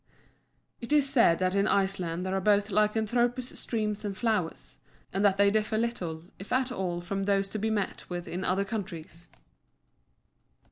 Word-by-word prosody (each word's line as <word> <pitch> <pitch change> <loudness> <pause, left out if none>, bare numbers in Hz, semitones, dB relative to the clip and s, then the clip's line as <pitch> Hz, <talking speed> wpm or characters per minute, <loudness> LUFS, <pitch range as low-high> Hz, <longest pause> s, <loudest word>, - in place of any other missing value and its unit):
It 235 - -7
is 295 -2 +4
said 230 -11 +4
that 185 +1 +1
in 200 0 +2
Iceland 185 -3 0
there 190 - -2
are 195 - 0
both 205 +1 +3
lycanthropous 230 +4 +1
streams 215 -2 -2
and 200 -2 -4
flowers, 215 -8 -2 0.3
and 195 +2 0
that 195 -1 +4
they 200 0 +5
differ 215 +1 0
little 180 -9 -2 0.2
if 195 - -10
at 255 0 +1
all 180 -6 -2
from 195 +2 -3
those 195 -1 +2
to 215 - -4
be 220 +2 0
met 210 -3 -2
with 175 -1 -5
in 180 +2 -4
other 190 +2 +1
countries. 175 -6 -6
200 Hz, 170 wpm, -29 LUFS, 185-220 Hz, 0.3 s, they